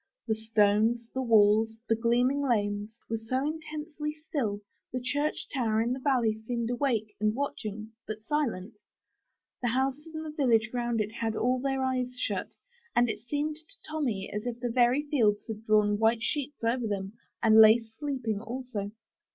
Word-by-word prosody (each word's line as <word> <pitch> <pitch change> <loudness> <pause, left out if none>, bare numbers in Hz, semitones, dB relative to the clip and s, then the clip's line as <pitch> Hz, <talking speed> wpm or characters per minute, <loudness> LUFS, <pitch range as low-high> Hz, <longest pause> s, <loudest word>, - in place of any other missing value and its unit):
The 220 - +2
stones, 220 +1 +2
the 260 - -1
walls, 220 -1 +4
the 225 - +3
gleaming 245 +5 +2
lanes, 210 -4 0
were 225 0 -2
so 255 +5 -1
intensely 305 -1 -4
still, 265 -10 -3 0.3
the 250 - -2
church 285 +4 -1
tower 225 -5 +1
in 235 +2 +1
the 260 - -4
valley 240 -6 +1
seemed 235 0 -2
awake 235 -5 0
and 215 +1 +1
watching, 220 -5 -4 0.2
but 215 0 -5
silent; 230 -8 -1 0.9
the 245 - 0
houses 265 +5 0
in 315 - -4
the 310 - -5
village 235 -7 +2
round 240 -2 0
it 210 0 -3
had 225 -1 -2
all 250 +3 +1
their 270 0 -1
eyes 250 -1 -1
shut; - - -2 0.4
and 240 -1 +4
it - - -7
seemed 290 +6 -2
to 315 0 -11
Tommy 260 -11 -2
as 210 +3 -3
if 240 -1 -4
the 240 -1 -2
very 245 +4 +3
fields 225 -9 +2
had 220 -1 -6
drawn 210 -1 +3
white 225 +1 +3
sheets 290 -2 -2
over 230 +1 +1
them, 195 -1 -3 0.3
and 220 -1 +8
lay 220 +1 +9
sleeping 230 -2 -4
also. 230 -3 -4
235 Hz, 170 wpm, -29 LUFS, 220-265 Hz, 0.9 s, lay